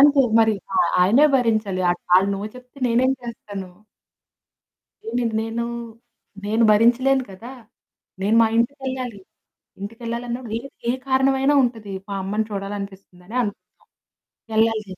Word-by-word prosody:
అంతే 280 0 +7 0.2
మరి 220 -1 +4 0.2
ఆ - - +1
ఆ - - -1
ఆయనే 235 +11 +6
భరించాలి. 215 -6 0
అటు 175 - -3
ఆళ్ళు 195 +2 +3
నొ 195 - -5 0.2
చెప్తే 250 +3 -15
నేనేం 250 +3 +3
చేస్తాను. 205 -5 -7 1.4
ఏ - - -11
నేను 235 -2 0
నేను, 225 +1 -3 0.8
నేను 220 +2 +2
భరించలేను 250 +5 +4
కదా! 225 +7 -10 0.7
నేను 205 +3 +2
మా 225 - +5
ఇంటికెళ్ళాలి. 255 -2 -2 0.6
ఇంటికెళ్ళాలన్నప్పుడు 235 +2 -5
ఏ - - -10 0.3
ఏ - - +5 0.2
కారణమైనా 270 +1 +3
ఉంటది 225 -5 -3 0.2
మా 200 - -3
అమ్మని 210 +3 -1
చూడాలనిపిస్తుందనే 195 0 -7
అనుకుందాం. 205 -4 -2 1.0
ఎల్లాల‌సిందె. 220 -4 +1
230 Hz, 125 wpm, -22 LUFS, 205-250 Hz, 1.4 s, అంతే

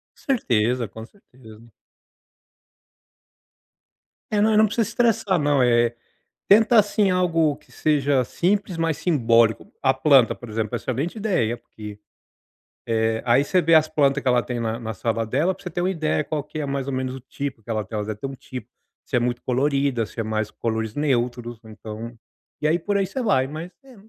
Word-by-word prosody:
Com - - -57
certeza, 120 - 0
com 110 +2 -10
certeza. 115 - -17 2.6
É, 210 - +2
não, 215 +1 +3
não 215 +1 +6
precisa 220 +1 0
estressar, 215 -5 +1
não, 145 -1 +2
eh, 120 -1 +3 0.6
tenta, 225 +4 +5
assim, 205 -1 +2
algo 165 -5 +2
que - - -25
seja 145 -3 +1
simples, 190 - -1
mas 165 -2 -1
simbólico. 115 -9 +2
A 130 -1 +4
planta, 135 -2 +4
por 120 - -11
exemplo, 110 +1 -2
excelente 130 - -3
ideia, 180 - 0
porque, 105 -3 -11 0.9
eh, 110 0 0
aí 120 +2 +4
você 185 +4 +2
vê 165 0 +2
as 155 -1 +6
planta 145 -3 +2
que - - -5
ela 125 -1 +3
tem 125 -1 -4
na 115 -1 -2
na 110 -1 -4
sala 115 +2 -1
dela 150 - 0
pra 195 - -18
você 180 - -5
ter 175 - -4
uma 180 - +1
ideia 155 -4 -1
qual 150 -2 -3
que 150 +1 -7
é, 150 - -2
mais 140 -1 -3
ou 140 - -3
menos 130 0 -2
o 135 - -9
tipo 130 -2 -6
que - - -18
ela 110 -2 -1
tem. 110 - -8
Ela 105 -1 -2
deve 105 -1 -5
ter 135 - -4
um 135 - -7
tipo: 130 -1 -9 0.4
se - - -3
é - - +4
muito 120 0 -1
colorida, 135 -2 +1
se 110 - -11
é - - 0
mais 110 -1 -2
cores 110 -1 -3
neutros, 120 -4 -1
então, 110 +1 -8 0.5
e 150 - +2
aí 160 +2 +3
por 200 +4 -1
aí 195 - +1
você 260 +8 -4
vai. 135 - +2
Mas 160 +5 -7
é, 260 -2 -15
135 Hz, 195 wpm, -23 LUFS, 115-165 Hz, 2.6 s, não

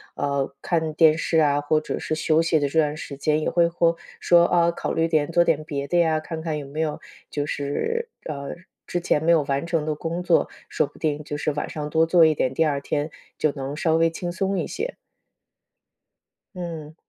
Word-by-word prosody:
呃， 140 -1 -1
看 160 -2 0
电 160 -2 +6
视 165 0 0
啊， 145 -1 +3
或 155 +1 +2
者 155 - -4
是 155 - -2
休 160 0 +2
息 165 -1 +2
的 145 - +1
这 160 +3 +1
段 150 0 +1
时 140 -2 -7
间， 150 +2 +1
也 - - -1
会 170 -1 +3
嚯 170 0 +2 0.2
说： 170 -1 +5
“啊， 170 -1 +3
考 - - -4
虑 165 0 +1
点 155 -1 +1
做 175 +1 +4
点 160 -3 +1
别 140 -2 -4
的 175 - +2
呀。” 160 -2 +3
看 160 0 -6
看 160 -2 -2
有 145 - -6
没 150 +3 -7
有 155 -2 -2 0.3
就 145 -1 -2
是 450 - -2 0.2
呃， 140 -2 -5 0.3
之 175 - -1
前 160 -3 +1
没 170 - +4
有 160 -3 +4
完 140 +2 -1
成 165 -3 0
的 155 - 0
工 165 +3 -4
作， 175 -2 +3 0.2
说 155 - +1
不 - - -19
定 150 -1 -1
就 145 0 -5
是 150 - -1
晚 150 - -4
上 150 -1 -4
多 160 +1 +3
做 170 -1 +6
一 155 - +4
点， 130 - 0
第 160 - +3
二 140 -2 0
天 150 +2 -2 0.3
就 155 - +2
能 140 0 -5
稍 160 0 +2
微 165 0 +4
轻 175 +1 -5
松 195 +1 -1
一 - - -1
些。 465 +5 -4 1.6
嗯。 160 -3 -6
155 Hz, 240 characters per minute, -24 LUFS, 145-170 Hz, 1.6 s, 电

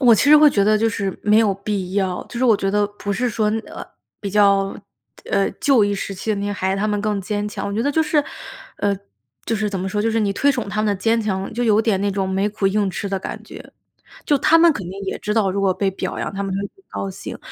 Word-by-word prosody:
我 245 -4 +7
其 220 - +2
实 300 - +10
会 300 0 +7
觉 200 -6 +2
得 215 +1 +3
就 225 - +2
是 200 -3 -3
没 210 +1 +4
有 215 -3 +3
必 195 -2 -4
要， 190 -3 -1
就 240 - -6
是 255 - +1
我 225 -4 +5
觉 195 - -1
得 205 +1 +2
不 205 -1 -2
是 245 +4 0
说， 215 -1 0 0.2
呃， - - -8 0.4
比 200 - -4
较， 200 -1 +3 0.5
呃， 195 - +1
旧 265 -7 +4
一 205 - 0
时 195 0 -4
期 215 +4 -4
的 210 - +1
那 200 +1 -3
些 205 - -2
孩 190 -1 -1
子， - - -3
他 210 - 0
们 210 -1 -1
更 210 -1 -1
坚 205 +1 -3
强。 205 - -5
我 200 - -3
觉 215 +3 -1
得 285 - +1
就 320 - +1
是， 305 -1 +2 0.5
呃， 200 -1 0 0.5
就 225 - -1
是 215 0 -1
怎 195 -2 -3
么 190 - -2
说， 210 +2 -1
就 225 - +1
是 225 0 +1
你 205 -2 +1
推 280 +8 +2
崇 240 -6 -3
他 210 - -5
们 - - 0
的 205 - +2
坚 225 +4 +1
强， 195 -2 -3
就 245 +2 -1
有 220 -1 +4
点 215 -4 +1
那 200 - 0
种 195 -1 -1
没 190 +2 0
苦 210 -1 -1
硬 205 0 +1
吃 200 +2 -4
的 195 -1 -1
感 - - -7
觉。 - - -12 0.5
就 290 - +2
他 310 +4 +5
们 335 0 +6
肯 245 - -6
定 190 +2 -8
也 190 - -3
知 210 +1 -2
道， 205 -4 +2
如 200 +2 -2
果 195 -1 +2
被 195 +1 0
表 190 - -4
扬， - - -3
他 200 - -3
们 195 - -3
会 195 - -1
很 375 - -9
高 195 - -4
兴。 190 - -8
205 Hz, 310 characters per minute, -21 LUFS, 195-225 Hz, 0.5 s, 实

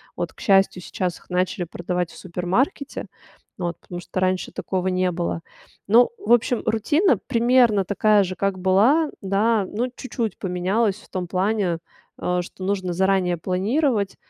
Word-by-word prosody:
Вот, - - -4
к - - -20
счастью, 195 -2 +3
сейчас 180 +1 -3
их - - -25
начали 180 0 -1
продавать 175 0 -3
в - - -14
супермаркете, 190 - -2 0.5
вот, 175 -1 -3
потому 175 -1 -7
что 185 - -4
раньше 185 0 0
такого 185 -1 -2
не 185 0 +1
было. 170 -1 -2 0.5
Ну, 235 +4 +6
в 225 - -4
общем, 240 0 +2
рутина 290 - +2
примерно 235 -5 +3
такая 210 +1 +3
же, 185 0 -4
как 195 -1 -1
была, 215 - +3
да. 200 +1 +1
Ну, 245 +4 -2
чуть-чуть 235 -6 -4
поменялась 190 +3 0
в 210 - -17
том 180 -1 -4
плане, 190 -1 0 0.4
э, 180 0 -1
что 185 +1 -10
нужно 190 -2 -1
заранее 190 -1 +2
планировать, 200 - 0
195 Hz, 155 wpm, -23 LUFS, 180-225 Hz, 0.5 s, Ну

